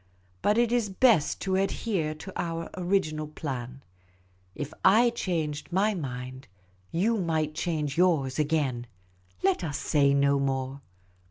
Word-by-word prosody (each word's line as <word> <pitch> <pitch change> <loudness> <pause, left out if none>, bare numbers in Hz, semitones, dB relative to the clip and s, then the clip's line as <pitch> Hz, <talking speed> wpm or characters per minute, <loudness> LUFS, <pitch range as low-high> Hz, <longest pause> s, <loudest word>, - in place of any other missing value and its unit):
But 210 - +2
it 235 -1 +3
is 240 -4 +1
best 205 - +3
to 190 -1 0
adhere 190 -4 -1
to 190 +5 -9
our 165 -1 -3
original 175 -5 0
plan. 135 -4 -6 0.7
If 145 0 -5 0.2
/ 240 0 +4
changed 160 -8 -3
my 200 +4 +2
mind, 130 -5 -6 0.4
you 220 +7 +1
might 160 -4 0
change 155 -3 -2
yours 155 -7 +2
again. 145 -6 0 0.6
Let 195 -2 +2
us 145 -3 -2
say 140 -2 +2
no 140 0 +3
more. 135 0 -2
155 Hz, 135 wpm, -27 LUFS, 140-190 Hz, 0.7 s, /